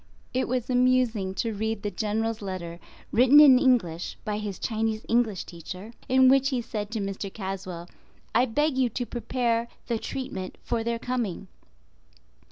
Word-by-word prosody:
It 260 +1 0
was 250 -1 -1
amusing 250 -6 +2
to 230 +1 -1
read 220 0 -2
the 205 - -2
General's 220 +1 -1
letter 175 -3 -5 0.3
written 255 +5 +7
in 270 -4 +9
English 180 -11 +1
by 210 0 -2
his 205 -3 -4
Chinese 220 -1 -2
English 230 -5 +1
Teacher, 185 +6 -9 0.2
in 260 0 +6
which 270 +1 +5
he 260 -3 0
said 210 -3 -4
to 225 0 -3
Mr. 195 0 -4
Caswell, 190 -4 -6 0.5
"I 245 - +4
beg 295 +3 +1
you 255 -2 +3
to 245 +2 -3
prepare 235 0 -1 0.2
the 235 -2 -1
treatment 215 -9 -5
for 230 - -1
their 235 0 -1
coming." 230 -6 -3
225 Hz, 160 wpm, -26 LUFS, 200-250 Hz, 0.5 s, in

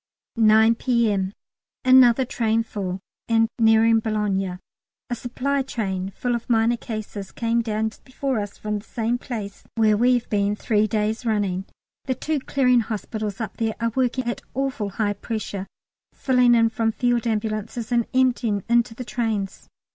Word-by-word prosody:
9 220 0 +5
P.M. 225 -6 +1 0.5
Another 255 -1 +6
train 230 -1 0
full, 195 -4 -4 0.3
and 225 0 +4
nearing 225 0 +5
Boulogne; 205 -4 -1 0.5
a - - +1
supply 265 +4 -1
train 195 -7 -3
full 245 -1 -1
of 235 0 -4
minor 230 0 +3
cases 215 -4 -6
came 235 0 0
down 220 -1 -1
just - - -20
before 260 -2 -2
us 205 -1 -5
from 210 -1 -3
the - - -14
same 235 +2 -2
place, 210 -6 -6
where 220 -2 +4
we've 245 +2 +2
been 205 0 +1
three 215 0 +1
days 215 +1 -1
running. 200 -5 0 0.4
The 260 -2 -1
two 305 +4 -1
Clearing 255 -2 +2
Hospitals 215 -2 -4
up 225 - -5
there 225 -1 -1
are 230 0 0
working 255 0 0
at 240 0 -3
awful 265 -6 -1
high 205 +1 -1
pressure 205 -2 -5 0.5
filling 250 -2 +4
in 230 -1 +4
from 225 0 0
Field 240 -1 +1
Ambulances, 220 +1 -2
and 235 -1 +2
emptying 240 -6 +1
into 235 -1 +2
the 250 - -6
trains. 220 -5 -3
225 Hz, 155 wpm, -23 LUFS, 210-240 Hz, 0.5 s, Another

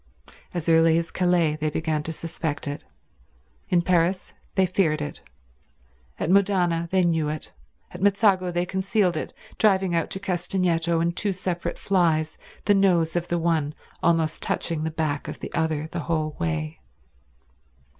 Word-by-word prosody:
As 175 -2 -4
early 165 0 +5
as 165 -1 -2
Calais 175 -4 +2
they 155 0 -1
began 155 0 -1
to 160 - -4
suspect 160 -2 -3
it; 145 0 -4 0.9
in 175 -1 +3
Paris 180 +1 +1 0.2
they 190 - +4
feared 175 -4 +1
it; 145 0 -5 1.0
at 165 - 0
Modane 180 -4 +2
they 185 0 +2
knew 165 -3 +1
it; 155 0 -5 0.4
at 180 - -9
Mezzago 200 -2 +3
they 175 0 0
concealed 190 0 +1
it, 155 - -4 0.3
driving 190 -4 +3
out 165 -1 0
to 190 - -3
Castagneto 175 -3 0
in 170 +1 +1
two 200 +3 -1
separate 175 -2 -3
flys, 160 -5 +1 0.3
the 205 - +5
nose 175 -5 +3
of 175 0 -1
the 175 - 0
one 160 -3 0 0.3
almost 165 -2 +1
touching 160 -2 0
the 160 - -1
back 155 -2 -2
of - - -6
the - - -7
other 160 -2 0
the 170 - -3
whole 155 -2 0
way. 80 -1 -2
170 Hz, 155 wpm, -25 LUFS, 160-185 Hz, 1.0 s, early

